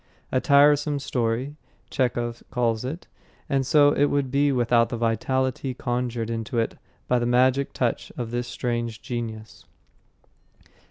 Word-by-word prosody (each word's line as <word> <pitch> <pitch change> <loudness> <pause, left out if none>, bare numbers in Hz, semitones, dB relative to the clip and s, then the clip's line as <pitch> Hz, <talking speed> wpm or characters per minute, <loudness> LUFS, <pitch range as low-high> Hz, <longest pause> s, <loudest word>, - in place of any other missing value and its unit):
A 130 - +1
Tiresome 145 -1 +4
Story, 130 +1 -2 0.3
Chekhov 120 -2 -1
calls 115 -3 0
it; 150 +7 -5 0.4
and 135 -1 +1
so 145 -1 +5
it 145 - +3
would 140 -3 0
be 140 +1 +3
without 120 -2 +2
the 120 - -3
vitality 130 +3 -1
conjured 120 -2 -2
into 115 +2 -3
it 115 - 0 0.3
by 125 - +2
the 120 - -1
magic 130 +3 +3
touch 120 -1 -2
of 120 -2 -4
this 120 0 -2
strange 120 -3 -3
genius. 110 -3 -6
125 Hz, 140 wpm, -25 LUFS, 115-135 Hz, 0.4 s, so